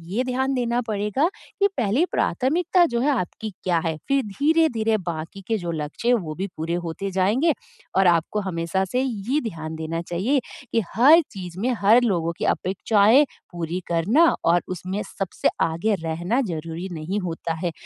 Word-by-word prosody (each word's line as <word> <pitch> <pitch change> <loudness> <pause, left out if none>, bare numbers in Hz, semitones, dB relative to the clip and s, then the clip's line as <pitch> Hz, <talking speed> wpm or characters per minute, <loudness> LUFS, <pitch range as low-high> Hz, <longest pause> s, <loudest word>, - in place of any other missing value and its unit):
ये 250 - +2
ध्यान 260 +1 0
देना 245 -1 0
पड़ेगा 210 - 0 0.3
कि 400 - +5
पहली 245 - +2
प्राथमिकता 345 +7 +2
जो 240 -7 -1
है 280 - +2
आपकी 220 -4 -2
क्या 175 -2 +2
है? 160 -1 0
फ़िर 275 0 +3
धीरे-धीरे 240 -2 +2
बाकी 170 0 -6
के 225 - +1
जो 175 -4 -4
लक्ष्य 150 +9 -4
हैं 245 - +6
वो 170 -9 -3
भी 190 +4 -3
पूरे 160 +2 -2
होते 170 +4 -4
जाएँगे 215 - +2 0.4
और 190 -1 +5
आपको 170 +4 +2
हमेशा 180 0 -1
से 250 +7 -1
ये 250 +2 -1
ध्यान 160 -2 -7
देना 160 +1 -3
चाहिए 190 +12 0 0.3
कि 230 - +2 0.2
हर 295 +9 +7
चीज़ 180 -3 -8
में 240 +5 0
हर 220 +5 +6
लोगों 170 -7 +1
की - - -2
अपेक्षाएँ 210 +7 +3 0.3
पूरी 175 0 -3
करना 195 - +3 0.2
और 170 +1 +4
उसमें 185 +3 -4
सबसे 195 -2 -2
आगे 165 +7 +1
रहना 170 +7 -1
ज़रूरी 165 - -4
नहीं 170 +5 -3
होता 170 -3 -3
है। 175 - 0
195 Hz, 170 wpm, -23 LUFS, 170-245 Hz, 0.4 s, हर